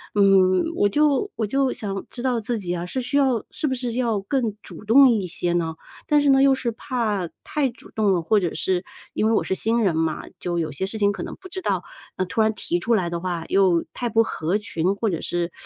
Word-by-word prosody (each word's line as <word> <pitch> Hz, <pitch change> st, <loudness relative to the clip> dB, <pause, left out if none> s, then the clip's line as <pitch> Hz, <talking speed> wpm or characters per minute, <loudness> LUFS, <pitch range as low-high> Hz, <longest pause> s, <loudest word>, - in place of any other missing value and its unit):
嗯， 190 Hz, -2 st, +5 dB
我 205 Hz, -, +3 dB
就 295 Hz, -, +2 dB
我 225 Hz, -, -1 dB
就 270 Hz, +3 st, +1 dB
想 195 Hz, -2 st, -5 dB
知 240 Hz, -, -7 dB
道 250 Hz, -3 st, +1 dB
自 230 Hz, +2 st, -2 dB
己 180 Hz, -2 st, -3 dB
啊， 175 Hz, 0 st, -4 dB
是 255 Hz, +9 st, -3 dB
需 255 Hz, +3 st, -1 dB
要 260 Hz, -6 st, +2 dB
是 305 Hz, -, -2 dB
不 265 Hz, -, 0 dB
是 245 Hz, -2 st, -3 dB
要 235 Hz, -4 st, 0 dB
更 225 Hz, -1 st, -1 dB
主 -, -, -11 dB
动 260 Hz, +5 st, +7 dB
一 215 Hz, -5 st, +1 dB
些 175 Hz, 0 st, -2 dB
呢？ 165 Hz, -2 st, -1 dB, 0.3 s
但 295 Hz, -1 st, +4 dB
是 285 Hz, -, +3 dB
呢， 270 Hz, 0 st, +5 dB
又 275 Hz, -1 st, +6 dB
是 240 Hz, -3 st, -2 dB
怕 220 Hz, -7 st, -2 dB, 0.2 s
太 295 Hz, -3 st, 0 dB
主 235 Hz, -, -14 dB
动 210 Hz, -3 st, +2 dB
了， 175 Hz, -, +1 dB
或 210 Hz, +6 st, +3 dB
者 175 Hz, -4 st, -2 dB
是 185 Hz, -1 st, -1 dB, 0.3 s
因 -, -, 0 dB
为 -, -, +2 dB
我 -, -, +2 dB
是 -, -, -2 dB
新 230 Hz, +2 st, +1 dB
人 180 Hz, -5 st, +2 dB
嘛， 160 Hz, -1 st, -1 dB, 0.2 s
就 175 Hz, -1 st, -2 dB
有 155 Hz, -2 st, -2 dB
些 165 Hz, +7 st, -3 dB
事 195 Hz, +3 st, -4 dB
情 200 Hz, 0 st, +3 dB
可 -, -, -5 dB
能 -, -, -6 dB
不 375 Hz, -1 st, -12 dB
知 375 Hz, +1 st, -5 dB
道， -, -, -1 dB, 0.3 s
那 185 Hz, -, 0 dB
突 180 Hz, +5 st, -1 dB
然 220 Hz, 0 st, +3 dB
提 175 Hz, -4 st, -1 dB
出 230 Hz, +7 st, 0 dB
来 180 Hz, -5 st, 0 dB
的 170 Hz, -, -3 dB
话 170 Hz, -2 st, -3 dB
又 185 Hz, -4 st, +3 dB
太 240 Hz, -1 st, -3 dB
不 225 Hz, +1 st, +4 dB
合 175 Hz, -3 st, -1 dB
群， 195 Hz, -3 st, -1 dB
或 220 Hz, +1 st, -1 dB
者 170 Hz, -, -3 dB
是 175 Hz, 0 st, -2 dB
210 Hz, 270 characters per minute, -23 LUFS, 180-245 Hz, 0.3 s, 动